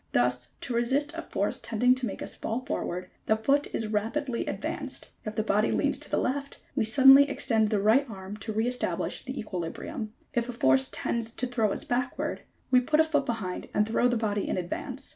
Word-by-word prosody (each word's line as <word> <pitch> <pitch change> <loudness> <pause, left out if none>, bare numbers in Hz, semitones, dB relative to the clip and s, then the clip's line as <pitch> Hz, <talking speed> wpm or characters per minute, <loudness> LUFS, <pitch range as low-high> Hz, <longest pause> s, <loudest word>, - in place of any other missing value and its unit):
Thus, 125 0 +1
to 245 - -3
resist 265 +6 +1
a 330 - -4
force - - -1
tending 245 +3 +3
to 255 -1 -2
make - - -5
us - - -3
fall 230 +3 -3
forward 185 - -4 0.2
the 220 - +3
foot 280 +6 +2
is 225 - -2
rapidly 230 +5 -1
advanced: - - -4
if 215 0 -4
the 215 - +1
body 210 0 +2
leans - - +1
to - - -7
the - - +1
left 280 +2 -2 0.2
we 240 -6 +2
suddenly 270 +4 +8
extend 220 -6 +1
the 210 -2 +1
right 230 +7 +3
arm 195 -1 -7
to 220 +1 -5
re 220 +2 0
establish 250 0 -1
the 265 +1 -5
equilibrium, 190 +2 -5 0.2
if 240 0 0
a - - -3
force 130 - +3
tends 230 -1 -2
to 255 - 0
throw 235 -4 +1
us - - -3
backward, 250 +1 -2 0.3
we 250 -1 +6
put 305 +5 +1
a - - +8
foot 295 -3 0
behind 210 -6 -3
and 210 0 +3
throw 230 +2 +3
the 245 -1 +1
body 210 -2 -1
in - - 0
advance. 255 +9 -4
230 Hz, 210 wpm, -28 LUFS, 210-260 Hz, 0.3 s, suddenly